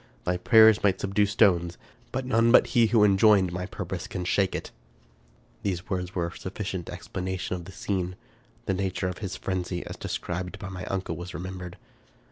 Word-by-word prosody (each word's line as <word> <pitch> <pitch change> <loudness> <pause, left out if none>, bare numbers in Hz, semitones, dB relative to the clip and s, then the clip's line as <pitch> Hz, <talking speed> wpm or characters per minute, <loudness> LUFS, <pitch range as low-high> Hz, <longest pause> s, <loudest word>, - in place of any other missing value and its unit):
Thy 90 - 0
prayers 110 +3 +6
might 95 -2 +3
subdue 100 +1 +1
stones; 90 -5 +3 0.3
but 130 0 -2
none 115 -2 +3
but - - +7
he 115 -2 +5
who 110 -1 +4
enjoined 100 -2 +5
my 90 +1 -3
purpose - - -5
can 90 - -4
shake 95 +2 +1
it." - - -5 0.9
These 95 -2 -3
words 90 +1 -3
were 85 -2 0
a 85 - -6
sufficient 95 -2 -5
explication 95 0 -4
of 85 -2 -7
the 95 - -10
scene. 90 -2 -2 0.5
The 95 - 0
nature 95 -1 -1
of 90 - -6
his 95 -2 -4
frenzy, 90 -1 -3
as - - -7
described 90 +2 -4
by 100 -3 -7
my 90 -1 -6
uncle, 95 -1 -3
was 90 0 -7
remembered. 90 -1 -6
95 Hz, 180 wpm, -27 LUFS, 90-100 Hz, 0.9 s, but